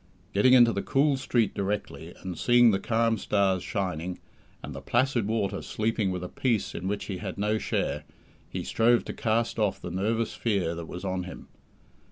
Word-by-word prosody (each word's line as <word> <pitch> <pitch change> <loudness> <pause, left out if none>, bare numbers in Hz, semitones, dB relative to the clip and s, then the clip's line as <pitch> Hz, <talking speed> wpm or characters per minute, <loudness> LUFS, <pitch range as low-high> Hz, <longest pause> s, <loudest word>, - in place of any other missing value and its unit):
Getting 125 +6 +5
into 120 -2 +7
the 100 - -1
cool 140 +5 +2
street 120 -4 +1
directly, 95 -4 -4
and 95 -2 -4
seeing 120 +4 +5
the 95 - +1
calm 115 +1 +1
stars 95 -3 +1
shining, 90 -3 -3 0.5
and 75 - -6
the 70 - -7
placid 120 - +1
water 100 -3 -1
sleeping 110 -2 -1
with 90 -1 -3
a - - -3
peace 105 -2 -1
in 95 - -4
which 100 +1 -2
he 95 - -4
had 95 -4 -5
no 105 +2 +1
share, - - -1 0.5
he - - -4
strove 120 +1 +3
to - - -5
cast 115 +1 0
off 105 -3 +1
the 90 - -6
nervous 110 +5 -1
fear 100 -7 0
that 85 -1 -6
was 90 +2 -7
on 95 -1 -2
him. 90 - -10
105 Hz, 190 wpm, -27 LUFS, 95-115 Hz, 0.5 s, into